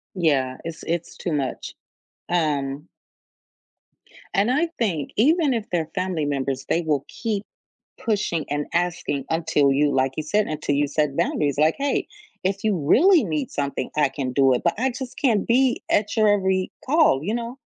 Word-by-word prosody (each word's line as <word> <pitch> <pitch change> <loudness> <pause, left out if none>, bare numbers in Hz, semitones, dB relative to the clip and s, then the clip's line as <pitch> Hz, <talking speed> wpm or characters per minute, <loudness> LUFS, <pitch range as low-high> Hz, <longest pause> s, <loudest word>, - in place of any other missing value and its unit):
Yeah, 135 -7 +1
it's 165 -1 -7
it's 170 0 -3
too 175 - -3
much. 140 -3 -3 0.6
Um 150 -3 -1 1.5
And 205 +5 +2
I 315 +6 +2
think 175 - -1
even 295 +3 +3
if 225 -3 -3
they're 165 -3 -1
family 185 -4 -1
members, 135 -2 -2
they 170 - +2
will 150 -4 -1
keep 215 -3 -3 0.5
pushing 200 -8 -1
and 145 0 -1
asking 170 -5 -1
until 155 -4 +2
you 145 +1 +2
like 130 0 +1
you 155 - -1
said, 205 +7 +1
until 150 -2 -2
you 145 0 +2
set 150 -1 -1
boundaries 145 -2 0
like, 155 +2 +3
"Hey, 280 0 -1 0.4
if 195 +2 -1
you 210 -4 +1
really 310 - +5
need 155 -7 -2
something, 140 -1 -3
I 145 -3 +3
can 135 -2 -4
do 135 0 +4
it, 125 - 0
but 170 - +2
I 260 +2 +1
just 255 0 -7
can't 225 -8 +2
be 255 +1 +2
at 210 +2 +1
your 215 -1 +4
every 190 -2 +1
call, 290 - +3
you 210 - -1
know?" 240 +3 -4
165 Hz, 175 wpm, -23 LUFS, 145-215 Hz, 1.5 s, really